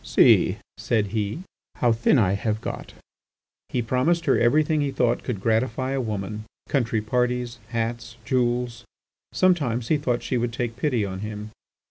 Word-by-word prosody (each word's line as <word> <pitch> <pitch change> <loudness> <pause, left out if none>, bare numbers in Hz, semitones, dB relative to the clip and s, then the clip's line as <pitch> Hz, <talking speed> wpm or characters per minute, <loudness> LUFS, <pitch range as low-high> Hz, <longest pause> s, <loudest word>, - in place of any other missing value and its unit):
"See," - - +4 0.2
said 105 -4 0
he, 110 - -2 0.3
"how 120 - +2
thin 115 +5 +3
I 100 -5 +3
have 105 +2 -1
got." - - -6 0.8
He 120 - -1
promised 155 +9 +1
her - - +4
everything 150 +5 +3
he 145 - 0
thought 120 -3 +1
could 120 -6 -3
gratify 115 +4 0
a 135 -1 0
woman, 105 -1 -4 0.2
country 115 -5 0
parties, 125 +1 -1
hats, 115 0 -3
jewels. 120 -1 0 0.5
Sometimes 140 -11 +1
he 155 - +4
thought 125 -4 -1
she 125 - -1
would 120 0 -1
take 115 -1 -3
pity 125 -6 0
on 95 -1 -5
him. 105 +1 -6
120 Hz, 155 wpm, -24 LUFS, 110-130 Hz, 0.8 s, See